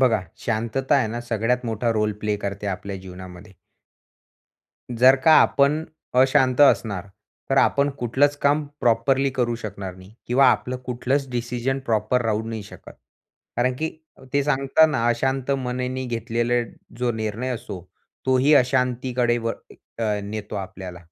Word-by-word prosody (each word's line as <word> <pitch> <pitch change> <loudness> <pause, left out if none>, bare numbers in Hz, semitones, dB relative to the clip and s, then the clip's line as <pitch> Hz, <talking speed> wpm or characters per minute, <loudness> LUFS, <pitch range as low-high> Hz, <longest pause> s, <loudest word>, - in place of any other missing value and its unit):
बघा, 115 -5 +3 0.2
शांतता 115 +5 0
आहे 130 -5 +2
ना, 120 +2 -4
सगळ्यात 120 +2 0
मोठा 115 +1 -1
रोल 105 -1 0
प्ले 105 -1 0
करते 100 +1 -5
आपल्या 100 0 -4
जीवनामध्ये. 95 +1 -11 1.4
जर 130 +3 +7
का 160 - +7
आपण 145 +3 +3 0.4
अशांत 130 0 +3
असणार, 100 -9 +3 0.4
तर 135 - +2
आपण 140 +1 +3
कुठलंच 140 +4 +2
काम 145 +2 +3 0.2
प्रॉपरली 130 +4 +2
करू 120 -3 -1
शकणार 100 -3 -6
नाही 95 +1 -15 0.2
किंवा 130 +3 +4
आपलं 130 +1 -1
कुठलंच 130 +3 -1
डिसिजन 125 +2 -2
प्रॉपर 110 +3 +1
राहू 110 0 0
नाही 110 -2 -5
शकत. 100 - -13 0.7
कारण 125 +1 +1
की 160 0 -1 0.4
ते 140 0 +2
सांगतना, 140 -2 +3
अशांत 130 +3 0
मनाने 130 -1 -2
घेतलेला 120 +1 -1 0.4
जो 125 -1 +1
निर्णय 110 +3 -3
असो, 100 -5 -7 0.5
तोही 130 +3 +4
अशांतीकडे 125 -2 +1
व 115 0 -2 0.5
अ, 105 -2 0
नेतो 105 +1 -6
आपल्याला. 95 -2 -7
120 Hz, 135 wpm, -23 LUFS, 110-130 Hz, 1.4 s, जर